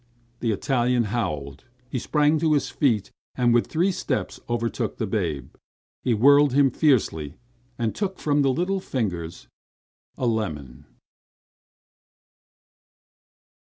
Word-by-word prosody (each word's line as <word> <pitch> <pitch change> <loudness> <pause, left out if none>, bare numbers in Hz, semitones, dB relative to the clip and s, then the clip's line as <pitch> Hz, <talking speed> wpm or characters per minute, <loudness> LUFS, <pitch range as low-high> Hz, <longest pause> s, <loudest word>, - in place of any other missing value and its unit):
The 115 - -1
Italian 125 +2 +1
howled. 75 - -3 0.2
He 125 0 -3
sprang 150 +4 +2
to 160 -1 +2
his 145 - 0
feet, 115 -9 +1 0.2
and 120 -2 +3
with 120 - +3
three 175 +5 +1
steps - - -3
overtook 115 -1 -2
the 110 - -1
babe. 85 - -3 0.5
He 120 - +1
whirled 140 +4 +5
him 140 -1 +4
fiercely, 110 - +1 0.4
and 115 -2 -1
took 195 -2 -3
from 145 -1 +1
the 135 - +3
little 180 +7 0
fingers 90 - -4 0.7
a 130 - -2
lemon. 80 - -3
120 Hz, 120 wpm, -24 LUFS, 100-145 Hz, 0.7 s, whirled